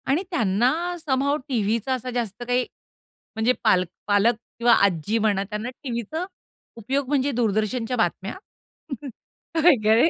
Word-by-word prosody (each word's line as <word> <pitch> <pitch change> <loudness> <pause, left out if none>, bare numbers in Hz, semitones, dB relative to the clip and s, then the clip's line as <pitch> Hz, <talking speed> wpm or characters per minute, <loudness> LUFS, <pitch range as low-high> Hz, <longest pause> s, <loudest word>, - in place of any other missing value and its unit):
आणि 290 +7 +2
त्यांना 225 - +2 0.3
some 275 -4 0
how 285 +1 +2
टीव्हीचा 230 0 0
असा 255 0 -3
जास्त 240 -2 -3
काही 245 0 +2 0.7
म्हणजे 225 +3 +2
पाल 180 -1 +4 0.2
पालक 205 +3 +4 0.2
किंवा 235 0 +5
आजी 195 +3 0
म्हणा 205 -3 +2
त्यांना, 210 +4 -4
टीव्हीचा 250 - -3 0.5
उपयोग 265 +5 -1
म्हणजे 285 0 +1
दूरदर्शनच्या 225 +1 0
बातम्या. 190 +1 -1 1.3
काय 320 -2 +7
कळे. 225 +9 +5
235 Hz, 130 wpm, -24 LUFS, 210-260 Hz, 1.3 s, काय